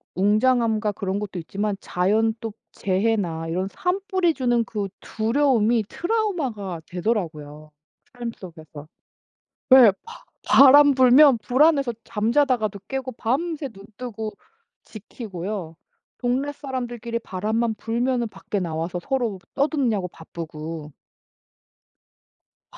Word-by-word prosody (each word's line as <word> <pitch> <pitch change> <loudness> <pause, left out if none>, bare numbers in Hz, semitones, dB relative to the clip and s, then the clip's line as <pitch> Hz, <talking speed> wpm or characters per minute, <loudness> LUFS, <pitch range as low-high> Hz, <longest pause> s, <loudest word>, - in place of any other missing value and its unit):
웅장함과 215 +2 +2
그런 195 0 -3
것도 195 -3 -5
있지만 200 +5 -3
자연 215 +5 +1
또 225 -2 -5 0.2
재해나 190 -4 -1
이런 185 +4 -2
산불이 370 -2 0
주는 240 -3 +1
그 205 -3 -4
두려움이 230 -2 +1
트라우마가 295 - -2
되더라고요. 155 -6 -3 0.4
삶 240 -2 -5
속에서. 155 -4 -11 0.8
네 255 -5 +9
바 460 +1 -12 0.2
바람 280 +1 +8
불면 260 +1 +6
불안해서 275 +1 +3
잠자다가도 225 -2 +1
깨고 265 -1 -4
밤새 280 +6 -2
눈 195 -3 -14
뜨고 220 -3 -5 0.5
지키고요. 195 -5 -7 0.4
동네 255 +4 0
사람들끼리 240 -4 -4
바람만 220 +3 -1
불면 240 +2 -1
밖에 195 +1 -4
나와서 170 +1 -3
서로 240 -6 -2 0.2
떠드냐고 265 - +1
바쁘고 160 -2 -8 1.8
아 - - -15
225 Hz, 255 characters per minute, -23 LUFS, 190-260 Hz, 1.8 s, 네